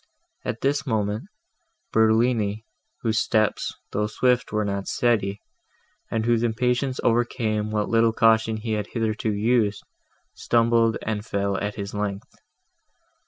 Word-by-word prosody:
At 115 Hz, -, -4 dB
this 140 Hz, +1 st, 0 dB
moment, 105 Hz, -2 st, -1 dB, 0.7 s
Bertolini, 110 Hz, -1 st, +2 dB, 0.4 s
whose 110 Hz, -1 st, +1 dB
steps, 110 Hz, -1 st, 0 dB, 0.2 s
though 105 Hz, +1 st, 0 dB
swift, 125 Hz, +3 st, +1 dB
were 105 Hz, -1 st, 0 dB
not 100 Hz, -1 st, -3 dB
steady, 105 Hz, -5 st, +1 dB, 0.7 s
and 110 Hz, -1 st, -1 dB
whose 120 Hz, -1 st, +2 dB
impatience 125 Hz, +3 st, 0 dB
overcame 115 Hz, -2 st, +1 dB
what 105 Hz, -1 st, -1 dB
little 115 Hz, 0 st, +3 dB
caution 110 Hz, 0 st, +3 dB
he 110 Hz, +1 st, -4 dB
had 105 Hz, -1 st, -2 dB
hitherto 110 Hz, -1 st, -1 dB
used, 105 Hz, 0 st, +1 dB, 0.5 s
stumbled, 115 Hz, -1 st, +2 dB
and 105 Hz, -1 st, -2 dB
fell 100 Hz, -3 st, -1 dB
at 105 Hz, 0 st, -3 dB
his 100 Hz, -1 st, -6 dB
length. 105 Hz, -1 st, -4 dB
110 Hz, 125 wpm, -24 LUFS, 105-115 Hz, 0.7 s, little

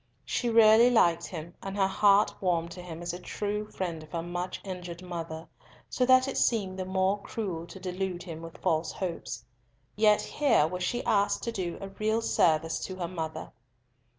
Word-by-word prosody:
She 240 Hz, -, -1 dB
really 225 Hz, +1 st, +7 dB
liked 170 Hz, -9 st, +3 dB
him, 170 Hz, -1 st, -7 dB
and 195 Hz, +1 st, -5 dB
her 195 Hz, -, +4 dB
heart 200 Hz, +2 st, +4 dB
warmed 170 Hz, -3 st, 0 dB
to 180 Hz, -, -8 dB
him 170 Hz, -1 st, -8 dB
as 175 Hz, -, -3 dB
a 175 Hz, -, -6 dB
true 210 Hz, +2 st, -3 dB
friend 170 Hz, -4 st, -4 dB
of 155 Hz, -, -14 dB
her 165 Hz, -1 st, -2 dB
much 175 Hz, +1 st, -4 dB
injured 180 Hz, -2 st, -7 dB
mother, 165 Hz, -2 st, -6 dB, 0.4 s
so 250 Hz, -, +1 dB
that 255 Hz, 0 st, +6 dB
it 270 Hz, -, -3 dB
seemed 195 Hz, -5 st, +1 dB
the 185 Hz, -, -2 dB
more 190 Hz, +2 st, +1 dB
cruel 180 Hz, -8 st, -4 dB
to 190 Hz, -, -10 dB
delude 180 Hz, -1 st, -3 dB
him 165 Hz, -2 st, -7 dB
with 165 Hz, 0 st, -9 dB
false 160 Hz, 0 st, 0 dB
hopes. 180 Hz, -3 st, -5 dB, 0.5 s
Yet 210 Hz, 0 st, +4 dB
here 265 Hz, -, +3 dB
was 180 Hz, +3 st, -4 dB
she 240 Hz, +7 st, -1 dB
asked 200 Hz, -1 st, +2 dB
to 235 Hz, -, -2 dB
do 180 Hz, -5 st, -3 dB
a 195 Hz, -, -6 dB
real 215 Hz, +3 st, -1 dB
service 160 Hz, -3 st, +2 dB
to 185 Hz, -, -6 dB
her 180 Hz, -2 st, -3 dB
mother! 160 Hz, -3 st, -5 dB
185 Hz, 190 wpm, -29 LUFS, 170-205 Hz, 0.5 s, really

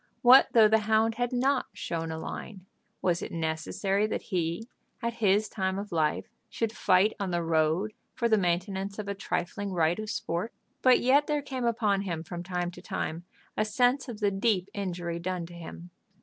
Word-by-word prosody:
What 255 Hz, +2 st, +8 dB
though 225 Hz, -2 st, +7 dB
the 220 Hz, +1 st, +4 dB
hound 220 Hz, +1 st, +3 dB
had 245 Hz, -, +1 dB
not 260 Hz, +2 st, +1 dB
"shown 165 Hz, -1 st, -4 dB
a 160 Hz, -, -4 dB
line?" 185 Hz, +3 st, -7 dB, 0.4 s
Was 175 Hz, -2 st, +1 dB
it -, -, -5 dB
necessary 170 Hz, +5 st, -1 dB
that -, -, -3 dB
he, 170 Hz, +5 st, -1 dB, 0.3 s
at 235 Hz, -1 st, -2 dB
his 205 Hz, +1 st, +3 dB
time 190 Hz, -2 st, -2 dB
of 205 Hz, +1 st, -5 dB
life, 160 Hz, -3 st, +1 dB, 0.2 s
should 225 Hz, -2 st, -2 dB
fight 200 Hz, -2 st, +3 dB
on 200 Hz, -2 st, -2 dB
the 175 Hz, -1 st, -1 dB
road 165 Hz, +5 st, +1 dB, 0.2 s
for 235 Hz, -, +1 dB
the 220 Hz, -, +4 dB
maintenance 190 Hz, +1 st, -1 dB
of 210 Hz, -2 st, -5 dB
a 200 Hz, -, -1 dB
trifling 195 Hz, +1 st, -3 dB
right 170 Hz, +1 st, +1 dB
of 215 Hz, -1 st, -5 dB
sport. 210 Hz, -3 st, -3 dB, 0.3 s
But 255 Hz, -1 st, +5 dB
yet 280 Hz, +4 st, +4 dB
there 295 Hz, -1 st, 0 dB
came 260 Hz, -3 st, -3 dB
upon 215 Hz, -4 st, +1 dB
him 170 Hz, -5 st, -3 dB
from 175 Hz, +1 st, -6 dB
time 175 Hz, -1 st, -3 dB
to -, -, -12 dB
time 165 Hz, +2 st, -4 dB, 0.3 s
a 215 Hz, -, +2 dB
sense 245 Hz, +5 st, +1 dB
of 225 Hz, -2 st, -7 dB
the 205 Hz, -1 st, +3 dB
deep 195 Hz, -2 st, +1 dB
injury 175 Hz, -4 st, -3 dB
done 180 Hz, 0 st, -3 dB
to 175 Hz, -, -12 dB
him. 170 Hz, +1 st, -9 dB
195 Hz, 190 wpm, -28 LUFS, 175-220 Hz, 0.4 s, What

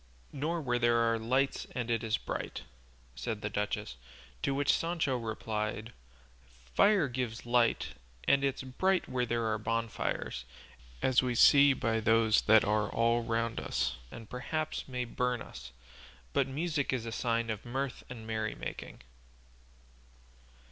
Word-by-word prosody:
"Nor 160 Hz, +4 st, -1 dB
where 120 Hz, -4 st, 0 dB
there 120 Hz, 0 st, +4 dB
are 115 Hz, -1 st, +2 dB
lights 130 Hz, +5 st, 0 dB
and 120 Hz, -2 st, -2 dB
it 115 Hz, -1 st, 0 dB
is 110 Hz, -1 st, +1 dB
bright," -, -, -5 dB, 0.5 s
said 105 Hz, -, -4 dB
the 105 Hz, -, -2 dB
duchess; 105 Hz, -11 st, -2 dB, 0.4 s
to 135 Hz, -, 0 dB
which 145 Hz, 0 st, +3 dB
Sancho 165 Hz, -5 st, 0 dB
replied, 110 Hz, -1 st, -3 dB, 0.8 s
"Fire 200 Hz, -, +5 dB
gives 120 Hz, -3 st, -4 dB
light, 120 Hz, -1 st, +2 dB, 0.4 s
and 140 Hz, 0 st, +4 dB
it's 135 Hz, -1 st, 0 dB
bright 185 Hz, +9 st, +1 dB
where 125 Hz, -1 st, -1 dB
there 115 Hz, 0 st, 0 dB
are 110 Hz, -1 st, 0 dB
bonfires, 110 Hz, -, -2 dB, 0.6 s
as 130 Hz, -1 st, +4 dB
we 125 Hz, -2 st, -1 dB
see 140 Hz, +3 st, +7 dB
by 115 Hz, -3 st, 0 dB
those 110 Hz, -1 st, +4 dB
that 110 Hz, 0 st, +5 dB
are 105 Hz, 0 st, +1 dB
all 115 Hz, +1 st, +2 dB
round 115 Hz, 0 st, -1 dB
us -, -, -1 dB
and 115 Hz, -, -10 dB
perhaps 155 Hz, +6 st, -3 dB
may 125 Hz, -2 st, -3 dB
burn 125 Hz, +1 st, -1 dB
us; 65 Hz, -, -9 dB, 0.6 s
but -, -, +2 dB
music 150 Hz, +1 st, -1 dB
is 125 Hz, -3 st, -2 dB
a 115 Hz, -, -4 dB
sign 115 Hz, 0 st, 0 dB
of 110 Hz, -1 st, -5 dB
mirth 130 Hz, +2 st, -3 dB
and 115 Hz, -3 st, -8 dB
merrymaking." 110 Hz, -, -4 dB
120 Hz, 145 wpm, -31 LUFS, 110-130 Hz, 0.8 s, see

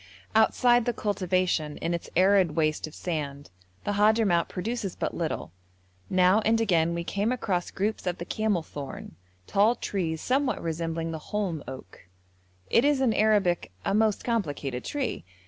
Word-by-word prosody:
Outside 240 Hz, +2 st, +4 dB
the 240 Hz, -, 0 dB
cultivation 185 Hz, -7 st, 0 dB
in 170 Hz, -, -2 dB
its 170 Hz, -, -4 dB
arid 185 Hz, -3 st, +4 dB
waste 155 Hz, -1 st, 0 dB
of 155 Hz, -, -12 dB
sand 145 Hz, -, -4 dB, 0.3 s
the -, -, -1 dB
Hadhramout 205 Hz, -4 st, +3 dB
produces 205 Hz, 0 st, -3 dB
but -, -, -2 dB
little; 160 Hz, -, -3 dB, 0.6 s
now 185 Hz, +2 st, +4 dB
and 225 Hz, +1 st, +2 dB
again 170 Hz, -6 st, +2 dB
we 170 Hz, -, -2 dB
came 200 Hz, +6 st, -1 dB
across 190 Hz, -8 st, -1 dB
groups 205 Hz, 0 st, -2 dB
of 180 Hz, 0 st, -1 dB
the 170 Hz, -, -6 dB
camelthorn, 170 Hz, -10 st, -3 dB, 0.3 s
tall 210 Hz, -, +3 dB
trees 165 Hz, -8 st, -2 dB
somewhat 265 Hz, -, 0 dB
resembling 165 Hz, 0 st, -3 dB
the 160 Hz, -, -4 dB
holm 190 Hz, -8 st, -2 dB
oak. 130 Hz, -9 st, -10 dB, 0.6 s
It 230 Hz, -, +5 dB
is 290 Hz, -1 st, +3 dB
in 255 Hz, -4 st, +3 dB
Arabic 205 Hz, -, +2 dB
a -, -, +1 dB
most 215 Hz, 0 st, +2 dB
complicated 145 Hz, -, -2 dB
tree. 285 Hz, -3 st, -3 dB
185 Hz, 150 wpm, -27 LUFS, 165-220 Hz, 0.6 s, It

